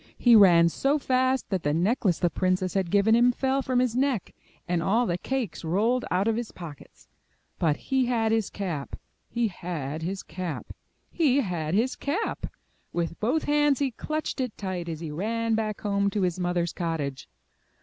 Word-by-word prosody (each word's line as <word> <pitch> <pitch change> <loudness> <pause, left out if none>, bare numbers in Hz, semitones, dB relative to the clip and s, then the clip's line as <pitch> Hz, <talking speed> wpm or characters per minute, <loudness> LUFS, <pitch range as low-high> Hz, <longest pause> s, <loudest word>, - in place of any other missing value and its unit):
He 240 -2 +6
ran 175 -5 +7
so 275 - +1
fast 260 -1 +1
that 190 -2 0
the 145 -1 0
necklace 185 0 +2
the 175 -2 +1
princess 185 0 0
17 - - -10
MY 195 - +2
BOOK 170 -3 -7
HOUSE - - +2
had 220 +2 +4
given - - +7
him - - +5
fell 265 +2 0
from 255 -1 -1
his 250 -2 +1
neck, 260 -6 0 0.3
and 175 -1 0
all 225 +8 +2
the 175 -4 -1
cakes 260 -11 -3
rolled 215 +10 +1
out 190 +4 +1
of 225 - +2
his 235 -2 -4
pockets. 160 -6 -11 0.5
But 155 -4 +2
he 265 -2 0
had 225 -3 +1
his 225 -3 +1
cap! 170 -8 -4 0.3
He 235 -1 0
had 160 -5 -5
his 190 +4 -4
cap! 175 -1 -6 0.4
He 285 -5 +3
had 175 - -2
his 240 +5 +1
cap! 340 +11 -2 0.4
With 170 -1 -3
both 255 +9 +1
hands 295 -1 +3
he 275 -2 0
clutched 310 +4 -3
it 250 -4 -4
tight 185 -3 -4
as 160 -1 -5
he 160 -3 -5
ran 225 +7 -1
back 215 -1 -1
home 200 -1 +1
to 200 0 -1
his 180 0 0
mother^s 175 -1 0
cottage. 155 - -3
200 Hz, 195 wpm, -26 LUFS, 175-250 Hz, 0.5 s, ran